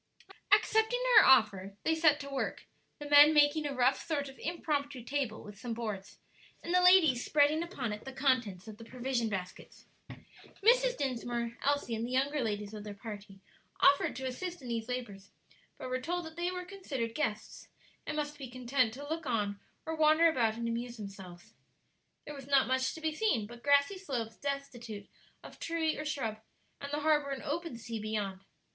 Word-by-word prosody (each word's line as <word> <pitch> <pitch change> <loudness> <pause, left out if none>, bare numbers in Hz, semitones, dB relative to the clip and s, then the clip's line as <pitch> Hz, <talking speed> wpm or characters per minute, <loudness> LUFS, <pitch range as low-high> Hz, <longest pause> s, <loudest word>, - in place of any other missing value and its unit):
Accepting 445 +3 +3 0.2
her 425 - +9
offer, 200 -6 +4
they 320 - +2
set 315 -2 +4
to 280 - -7
work, 275 - -3 0.3
the 295 - -7
men 290 +1 +8
making 295 +1 +4
a 280 - -4
rough 255 +1 +2
sort 285 -4 -2
of 270 - -14
impromptu 285 -6 -2
table 260 -4 -3
with 205 -1 -11
some 235 0 -4
boards, 210 -4 -5 0.5
and 340 - -3
the 360 - +5
ladies 350 -9 +6
spreading 300 +2 +3
upon 275 - -4
it 210 - -8
the 265 - -7
contents 250 -8 0
of 215 -1 -9
the 230 - -11
provision 245 -1 -2
baskets. 185 -3 -7 0.8
Mrs. - - +4
Dinsmore, 240 -3 -2
Elsie 285 -4 0
and 225 0 -2
the 240 - -3
younger 280 +3 +1
ladies 210 -2 -3
of 210 -1 -7
their 210 -1 -7
party, 200 -2 -9 0.4
offered 280 - +4
to 265 - -5
assist 350 +8 -4
in 255 -4 -9
these 230 0 -3
labors, 205 -6 -5 0.5
but - - -7
were 255 0 -2
told 350 +4 -3
that 320 0 -10
they 345 +1 -1
were 360 0 -5
considered 285 -12 -4
guests, 220 -7 -3 0.4
and 300 - -3
must 295 0 -3
be 265 -3 -7
content 250 -1 0
to 285 +2 -8
look 320 0 -4
on 205 -4 -1 0.3
or 320 - -3
wander 315 +1 +5
about 235 -9 +1
and 235 0 -3
amuse 235 +1 -4
themselves. 190 -4 -10 0.7
There 295 - -7
was 275 -2 -10
not 275 -1 +4
much 260 0 0
to 320 - -9
be 315 -1 -1
seen 305 - +1
but 240 +2 -12
grassy 285 +8 +3
slopes 240 - -4
destitute 240 -7 -5 0.4
of - - -12
tree 330 -1 -1
or 305 - -5
shrub, 230 -8 -3 0.4
and 280 0 -7
the 295 +1 -2
harbor 295 -2 +2
and 275 -1 -4
open 325 -3 -3
sea 230 -1 -6
beyond. 210 -3 -3
265 Hz, 190 wpm, -32 LUFS, 225-300 Hz, 0.8 s, her